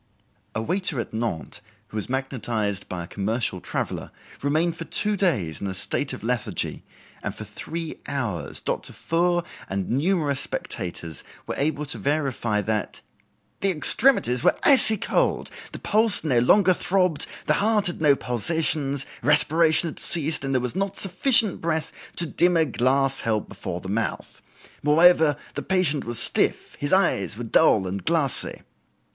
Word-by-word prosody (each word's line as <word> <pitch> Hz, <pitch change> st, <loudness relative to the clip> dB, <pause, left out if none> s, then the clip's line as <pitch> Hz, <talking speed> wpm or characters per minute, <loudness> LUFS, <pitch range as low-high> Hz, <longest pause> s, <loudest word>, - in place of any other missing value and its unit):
A 110 Hz, -, -2 dB
waiter 180 Hz, -, 0 dB
at 115 Hz, -, -5 dB
Nantes, 110 Hz, -8 st, -4 dB, 0.3 s
who 110 Hz, -, -7 dB
was 105 Hz, -, -3 dB
magnetized 115 Hz, -6 st, -3 dB
by 90 Hz, -2 st, -5 dB
a -, -, -10 dB
commercial 100 Hz, -1 st, -2 dB
traveler, -, -, -4 dB, 0.3 s
remained 160 Hz, +4 st, 0 dB
for 165 Hz, -, -7 dB
two 210 Hz, +4 st, +6 dB
days 110 Hz, -, -1 dB
in 100 Hz, -, -3 dB
a 95 Hz, -, -4 dB
state -, -, -2 dB
of -, -, -8 dB
lethargy, 120 Hz, -1 st, -3 dB, 0.4 s
and -, -, -5 dB
for -, -, -7 dB
three 155 Hz, -, -7 dB
hours 110 Hz, -, -2 dB
Dr. -, -, -4 dB
Foure 175 Hz, +1 st, 0 dB, 0.3 s
and 95 Hz, -1 st, -3 dB
numerous 145 Hz, 0 st, 0 dB
spectators 85 Hz, -2 st, -5 dB, 0.2 s
were -, -, -4 dB
able 150 Hz, +1 st, -1 dB
to -, -, -2 dB
verify 135 Hz, -7 st, -1 dB
that 105 Hz, +1 st, -3 dB, 0.6 s
"the 195 Hz, -, +2 dB
extremities 155 Hz, -, +2 dB
were -, -, +4 dB
icy 255 Hz, -6 st, +7 dB
cold, -, -, -1 dB, 0.2 s
the -, -, -7 dB
pulse 215 Hz, -3 st, +1 dB
no 130 Hz, -7 st, +2 dB
longer 185 Hz, -, +4 dB
throbbed, 180 Hz, -4 st, 0 dB, 0.2 s
the 150 Hz, -, +3 dB
heart 210 Hz, -1 st, +2 dB
had 175 Hz, -, -2 dB
no 145 Hz, -3 st, +5 dB
pulsations, 140 Hz, +3 st, -1 dB, 0.2 s
respiration 155 Hz, +4 st, +3 dB
had 160 Hz, -, -7 dB
ceased, 160 Hz, -2 st, 0 dB
and 135 Hz, -1 st, -2 dB
there 130 Hz, -, +2 dB
was 125 Hz, +4 st, -4 dB
not 195 Hz, 0 st, -2 dB
sufficient 215 Hz, +2 st, +4 dB
breath 160 Hz, -1 st, -2 dB, 0.2 s
to 170 Hz, -, +1 dB
dim 175 Hz, +2 st, +2 dB
a 160 Hz, -, +3 dB
glass 135 Hz, +1 st, +1 dB
held 110 Hz, -2 st, -1 dB
before 85 Hz, -, -6 dB
the 95 Hz, -, -9 dB
mouth. 105 Hz, +3 st, -4 dB, 0.4 s
Moreover, 160 Hz, 0 st, +4 dB, 0.2 s
the -, -, -4 dB
patient 180 Hz, -6 st, +1 dB
was 120 Hz, 0 st, -3 dB
stiff, -, -, 0 dB
his 145 Hz, -, -3 dB
eyes 105 Hz, -, +1 dB
were 120 Hz, -, -5 dB
dull 110 Hz, -3 st, +3 dB
and 95 Hz, +1 st, -5 dB
glassy." 160 Hz, -6 st, 0 dB
145 Hz, 160 wpm, -24 LUFS, 115-170 Hz, 0.6 s, icy